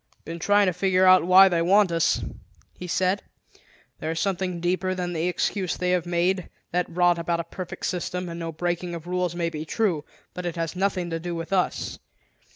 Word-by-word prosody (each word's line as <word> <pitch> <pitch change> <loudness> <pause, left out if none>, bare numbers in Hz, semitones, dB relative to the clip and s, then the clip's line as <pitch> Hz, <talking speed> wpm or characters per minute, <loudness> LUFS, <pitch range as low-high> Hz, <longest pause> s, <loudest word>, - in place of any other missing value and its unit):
"Been 165 +2 -6
trying 205 +3 +4
to 185 - +1
figure 185 +1 +2
out 185 -1 +6
why 190 +1 +8
they 175 -3 +1
want 195 +2 +4
us," 165 -1 +1 0.5
he 180 - -8
said. 185 +3 +1 0.8
"There 155 - -3
is 165 0 -2
something 185 -1 -1
deeper 185 +2 0
than 180 -1 -3
the 165 +1 -1
excuse 185 +1 -1
they 180 0 0
have 180 -1 0
made; 175 +1 0 0.2
that 180 0 0
rot 175 0 +2
about 170 0 -1
a - - -1
perfect 180 +2 -7
system 180 0 -3
and 170 0 -6
no 165 -1 -4
breaking 175 +1 -3
of 165 -1 -8
rules 180 -1 -1
may 170 -1 -1
be 155 -1 -5
true, 170 -3 0 0.3
but 180 - -6
it 170 - -4
has 165 0 -3
nothing 185 -2 -1
to 165 - -2
do 175 +1 -4
with 165 +3 -5
us. 185 -2 -1
175 Hz, 205 wpm, -25 LUFS, 170-185 Hz, 0.8 s, why